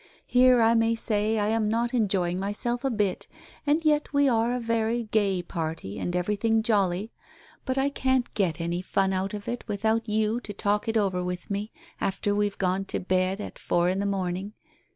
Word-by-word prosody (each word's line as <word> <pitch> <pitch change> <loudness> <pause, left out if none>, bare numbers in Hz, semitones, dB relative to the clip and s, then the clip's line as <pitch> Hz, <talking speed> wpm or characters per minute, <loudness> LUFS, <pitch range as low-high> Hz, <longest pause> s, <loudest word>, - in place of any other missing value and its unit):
Here 250 -1 +5
I 225 +1 +5
may 225 0 +3
say 215 -1 0
I 210 0 +1
am 220 -1 +1
not 235 +2 0
enjoying 190 -6 +1
my 200 +1 -2
self 240 +3 -3
a 270 - +1
bit, 210 -6 -1 0.4
and 310 +3 +2
yet 300 -1 +2
we 285 0 +3
are 230 -1 +2
a 250 - -1
very 230 0 0
gay 205 -4 +1
party 160 - -4
and 175 - -2
everything 210 +5 +1
jolly. 205 -2 +1 0.5
But 260 0 -1
I 270 +1 +2
can't 260 -3 0
get 180 -6 0
any 170 +1 -2
fun 190 +1 +1
out 190 +2 -2
of 205 -1 -8
it 240 0 -3
without 220 +2 0
you 215 +2 +1
to 205 - -7
talk 205 +2 0
it 225 0 +1
over 190 -4 +1
with 180 +2 -5
me, 205 +2 -3 0.3
after 195 +1 0
we've 205 -1 0
gone 190 +1 0
to - - -2
bed 185 +1 0
at 210 - -7
four 175 +1 +1
in 190 +1 0
the 200 - 0
morning. 190 +1 -2
210 Hz, 200 wpm, -26 LUFS, 190-230 Hz, 0.5 s, Here